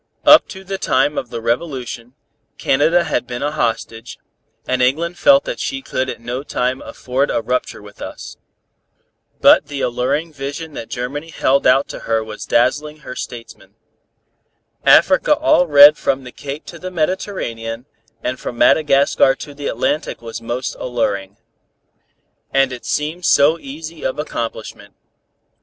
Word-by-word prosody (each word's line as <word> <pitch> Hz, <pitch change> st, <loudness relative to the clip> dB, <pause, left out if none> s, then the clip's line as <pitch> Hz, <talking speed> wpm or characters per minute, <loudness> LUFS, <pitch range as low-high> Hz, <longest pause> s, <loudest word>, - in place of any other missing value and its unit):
Up -, -, +8 dB
to 190 Hz, -1 st, -10 dB
the 195 Hz, 0 st, -5 dB
time 150 Hz, -, +1 dB
of 125 Hz, -, -4 dB
the 115 Hz, -, -6 dB
revolution, 125 Hz, -1 st, -3 dB, 0.4 s
Canada 160 Hz, +6 st, +2 dB
had 125 Hz, -, -2 dB
been 120 Hz, +2 st, -5 dB
a 145 Hz, -, 0 dB
hostage, 115 Hz, -4 st, -3 dB, 0.5 s
and 130 Hz, 0 st, 0 dB
England 160 Hz, +8 st, +1 dB
felt 280 Hz, 0 st, +6 dB
that -, -, -5 dB
she 270 Hz, -1 st, -3 dB
could 130 Hz, -, -2 dB
at -, -, -6 dB
no 120 Hz, +3 st, -4 dB
time 130 Hz, -2 st, -2 dB
afford 130 Hz, +3 st, -2 dB
a -, -, 0 dB
rupture 125 Hz, -6 st, -3 dB
with 105 Hz, 0 st, -15 dB
us. -, -, -8 dB, 1.1 s
But -, -, +6 dB
the 140 Hz, -2 st, -5 dB
alluring 135 Hz, +7 st, -1 dB
vision 145 Hz, +3 st, -6 dB
that 115 Hz, -, -7 dB
Germany 140 Hz, +6 st, -5 dB
held 140 Hz, -4 st, +1 dB
out 135 Hz, +2 st, +4 dB
to -, -, -7 dB
her 115 Hz, -1 st, -1 dB
was 110 Hz, -1 st, -8 dB
dazzling 150 Hz, +5 st, +1 dB
her 125 Hz, -, -8 dB
statesmen. 120 Hz, -3 st, -9 dB, 1.1 s
Africa -, -, +5 dB
all 180 Hz, -, +3 dB
red 145 Hz, 0 st, +8 dB
from 135 Hz, 0 st, -1 dB
the 125 Hz, -, -10 dB
Cape 140 Hz, +3 st, -7 dB
to 170 Hz, -, -10 dB
the 185 Hz, -, -6 dB
Mediterranean 155 Hz, -, -3 dB, 0.4 s
and 125 Hz, 0 st, -3 dB
from 120 Hz, -, -6 dB
Madagascar 135 Hz, 0 st, +4 dB
to 145 Hz, -, -9 dB
the 140 Hz, 0 st, -6 dB
Atlantic 145 Hz, +6 st, -2 dB
was 115 Hz, 0 st, -8 dB
most 120 Hz, +3 st, -4 dB
alluring. 100 Hz, -5 st, -2 dB, 1.1 s
And 135 Hz, -1 st, +2 dB
it 125 Hz, -, -9 dB
seemed 155 Hz, +4 st, -2 dB
so 155 Hz, +4 st, +4 dB
easy 155 Hz, +3 st, -9 dB
of 130 Hz, -, -2 dB
accomplishment. 115 Hz, -7 st, -6 dB
135 Hz, 150 wpm, -18 LUFS, 120-155 Hz, 1.1 s, Up